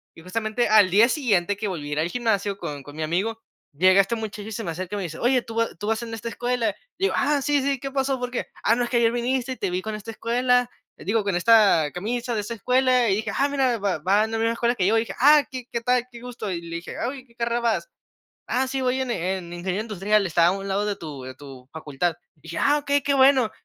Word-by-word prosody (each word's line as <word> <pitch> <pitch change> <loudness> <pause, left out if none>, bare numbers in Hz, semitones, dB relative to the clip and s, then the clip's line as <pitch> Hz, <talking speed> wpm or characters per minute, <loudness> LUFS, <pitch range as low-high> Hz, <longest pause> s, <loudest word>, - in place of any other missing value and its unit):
y 165 - -13
justamente 220 +5 -1
al 210 -3 +6
día 210 +6 +5
siguiente 205 - +1
que 205 +1 -3
volví 155 -6 -5
a - - -6
ir 150 - -1
al 165 - 0
gimnasio 205 -3 -1
con 145 -5 -6
con 145 +2 -12
mi 155 - -3
amigo, 200 +8 -1 0.3
llega 185 +6 +5
este 195 +4 -2
muchacho 215 -2 -6
y - - -9
se 225 +1 -4
me 170 - -3
acerca, 185 +4 -5
y - - -2
me 200 - -3
dice, 165 -2 -6
oye: 245 0 +2
"¿Tú 225 - -9
va 230 0 +2
tú 205 - -6
vas 225 +1 0
en 235 -1 -7
esta 230 +1 -7
escuela?". 240 -2 -1 0.3
Y 385 - -6
digo: - - +1
"Ah, 290 +1 +2
sí, 290 0 +2
sí, 275 0 0
¿qué 275 +1 -5
pasó? 270 0 0
¿Por 250 0 -4
qué?". 250 - -3 0.2
"Ah, 225 - +4
no, 245 - 0
es 240 - -3
que 245 - +1
ayer 230 -1 +3
viniste 250 +2 -1
y 260 - -5
te 195 - -2
vi 180 +1 -2
con 220 - -4
esta 215 +1 -7
escuela, 245 +2 +1 0.3
digo, 215 +2 0
con 200 -3 -1
esta 195 -7 +5
camisa 240 +6 -3
de 215 - 0
esta 230 +3 -5
escuela 250 +1 +2
y 195 - +2
dije: 220 - -3
"Ah, 280 - +3
mira, 265 -4 +1
va 195 -6 -1
va 195 +6 +3
en 220 - -7
la 225 - -1
misma 230 +1 +1
escuela 235 +1 +1
que 190 -5 +1
yo". 225 +2 +3
Y - - +3
dije: 230 - -5
"Ah, 295 +2 +6
¿qué 255 -2 -6
qué 235 - -2
tal? 250 +1 +2
Qué 235 - -11
gusto". 240 -4 -6
Y 170 -2 -3
le 170 0 -6
dije: 170 - -8
"Oye, 260 +3 -3
¿en 255 - -26
qué 235 - -25
carrera 235 0 -1
vas?" 235 - -1 0.6
"Ah, 260 +1 0
sí, 265 0 -2
voy 255 +1 0
en, 260 -1 -2
eh, 190 -2 -1
en 170 -1 -10
ingeniero 185 +3 -3
industrial, 210 -1 +1
está 170 -1 +3
a 175 - +4
un 195 0 -5
lado 200 +2 0
de 205 - -1
tu 150 -7 -8
de 130 0 -8
tu 130 -2 -13
facultad". 160 +2 -2 0.2
Dije: 165 +2 -7
"Ah, 290 +1 +3
okey, 285 -1 0
qué 280 0 +1
bueno". 265 -3 +5
225 Hz, 280 wpm, -24 LUFS, 185-245 Hz, 0.6 s, al